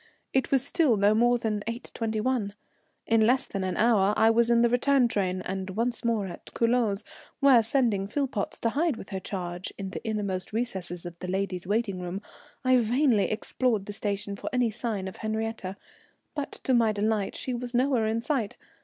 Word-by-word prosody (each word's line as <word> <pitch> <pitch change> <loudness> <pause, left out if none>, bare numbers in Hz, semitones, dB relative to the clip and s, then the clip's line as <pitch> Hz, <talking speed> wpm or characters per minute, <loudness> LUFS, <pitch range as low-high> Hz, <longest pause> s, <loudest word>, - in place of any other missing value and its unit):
It 265 - +2
was 270 -1 +2
still 285 -7 +3
no 200 +1 +4
more 240 +2 +4
than 215 -3 -2
8.21. 225 -1 -2 0.5
In 225 -1 +3
less 250 +5 +3
than 195 - -4
an 185 -1 -2
hour 210 -3 +4
I 225 0 +5
was 235 +1 +3
in 235 0 +4
the 235 - +4
return 250 +1 +3
train 185 -4 -1
and 190 0 -4
once 230 +5 -1
more 230 -4 +1
at 180 - -9
Culoz, 230 -3 +2 0.4
where, 270 -4 +7
sending 225 -4 +1
Philpotts 250 -3 -2
to 230 - +2
hide 295 +1 0
with 190 - -10
her 195 -2 -3
charge 180 -1 -5
in 195 -1 -5
the - - -5
inmost 205 -4 -3
recesses 190 -7 -3
of 170 -1 -8
the 180 - -6
ladies' 185 -1 -2
waiting 205 -2 0
room, 180 +2 -4 0.5
I 255 0 +5
vainly 240 -1 +3
explored 220 -1 0
the 205 - -6
station 200 -1 -2
for - - -5
any 250 -3 +2
signs 215 -4 -3
of 190 - -8
Henriette, 220 -3 -3 0.6
but 290 -2 -4
to 260 - +1
my 230 -3 +4
delight 210 -1 0
she 255 - -3
was 245 0 -4
nowhere 250 -3 +2
in 225 +1 0
sight. 245 -6 -1
220 Hz, 190 wpm, -27 LUFS, 195-240 Hz, 0.6 s, where